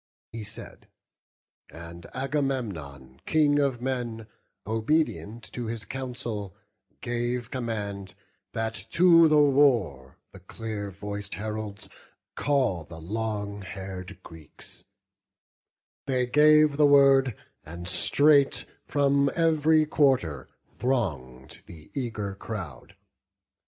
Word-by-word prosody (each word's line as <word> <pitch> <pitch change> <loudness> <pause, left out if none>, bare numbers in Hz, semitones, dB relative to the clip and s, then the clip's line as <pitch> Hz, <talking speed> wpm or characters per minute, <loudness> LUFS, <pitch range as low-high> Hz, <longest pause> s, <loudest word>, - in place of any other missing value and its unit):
He 115 -1 -6
said; 105 +2 -10 0.8
and 85 +1 -11
Agamemnon, 105 - -3
King 145 -2 +3
of 135 -4 0
men, 120 -4 -3 0.4
Obedient 115 - -1
to 120 -2 -4
his 110 -2 -5
counsel, 120 -6 -5 0.5
gave 120 0 -2
command 100 -6 -4 0.4
That 110 0 -2 0.2
to 170 -2 +7
the 155 -1 +4
war 125 - +3
the 95 - -13
clear 105 +2 -6
voic'd 100 0 -6
heralds 105 +1 -5 0.5
call 130 - 0
The 80 +2 -11
long 105 +3 -4
hair'd 95 -1 -8
Greeks: 80 -3 -12 1.2
they 130 -2 +1
gave 150 +2 +5
the 150 -1 +6
word, 135 -3 +5 0.3
and 85 +2 -8
straight 140 +8 +3 0.2
From 140 -1 +2
ev'ry 160 -2 +3
quarter 130 - +1 0.3
throng'd 70 - -3
the 80 -3 -14
eager 110 -7 -3
crowd. 95 -5 -8
115 Hz, 100 wpm, -27 LUFS, 95-140 Hz, 1.2 s, to